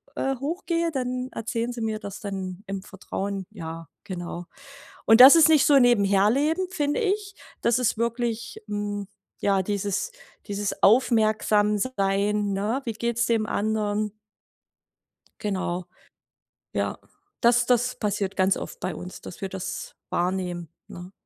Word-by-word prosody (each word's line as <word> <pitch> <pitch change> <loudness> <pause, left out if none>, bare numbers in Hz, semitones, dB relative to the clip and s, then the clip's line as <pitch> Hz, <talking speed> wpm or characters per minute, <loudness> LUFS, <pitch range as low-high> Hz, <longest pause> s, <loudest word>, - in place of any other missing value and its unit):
äh, 270 -1 0
hochgehe, 335 +4 -1
dann 255 -2 -2
erzählen 230 +1 -3
Sie 235 - -6
mir 220 -1 -2
das 200 -1 -7
dann 190 -1 -5
im 195 0 -4
Vertrauen, 195 0 -5
ja, 165 -5 -7 0.2
genau. 175 -1 -6 0.6
Und 225 +2 +6
das 265 +4 +12
ist 325 -1 +7
nicht 310 -3 +5
so 285 -2 +7
nebenher 205 -4 +4
leben, 315 +9 +1
finde 295 -2 0
ich. 405 -1 -1 0.3
Das 235 +1 +3
ist 230 -3 +1
wirklich, 235 0 -2
hm, 205 -1 -3 0.3
ja, 195 -1 +2
dieses 205 - -2 0.4
dieses 205 -1 -3
Aufmerksam-Sein, 210 -2 +2
ne, 210 +7 -1
wie 230 - -2
geht's 235 +1 -1
dem 225 -2 +1
anderen? 210 0 -1 1.3
Genau, 185 -3 -2 0.9
ja. - - -1 0.4
Das 240 0 +4
das 245 0 +2
passiert 205 -2 -2
ganz 190 0 +3
oft - - -7
bei 185 - -3
uns, 180 +1 -8
dass 185 - -10
wir 195 - -3
das 190 0 -6
wahrnehmen, 175 -2 -2 0.2
ne? 180 +1 -10
210 Hz, 135 wpm, -25 LUFS, 195-245 Hz, 1.3 s, das